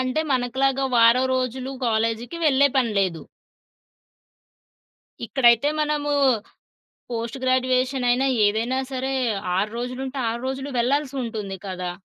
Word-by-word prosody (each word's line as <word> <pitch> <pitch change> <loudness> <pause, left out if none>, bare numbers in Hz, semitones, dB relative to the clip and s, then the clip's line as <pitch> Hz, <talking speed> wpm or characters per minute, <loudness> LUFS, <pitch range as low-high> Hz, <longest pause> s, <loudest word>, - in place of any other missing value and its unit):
అంటే 255 +4 0
మనకులాగా 265 +2 0
వారం 235 +2 +5
రోజులు 255 +1 -2
కాలేజీకి 230 +6 -1
వెళ్ళే 280 0 +4
పని 235 -4 +1
లేదు. 180 -4 -1 2.0
ఇక్కడైతే 240 +2 +4
మనము 295 -1 -1 1.0
పోస్ట్ 230 +2 -4
గ్రాడ్యుయేషనైనా 255 0 +1 0.2
ఏదైనా 225 +5 0
సరే 265 0 -2 0.5
6 210 +3 0
రోజులుంటే 255 +3 -5
6 235 +1 -4
రోజులు 265 +1 -4
వెళ్ళాల్సి 275 +3 0
ఉంటుంది 210 -4 -5
కదా! 180 -1 -4
255 Hz, 105 wpm, -23 LUFS, 230-265 Hz, 2.0 s, వారం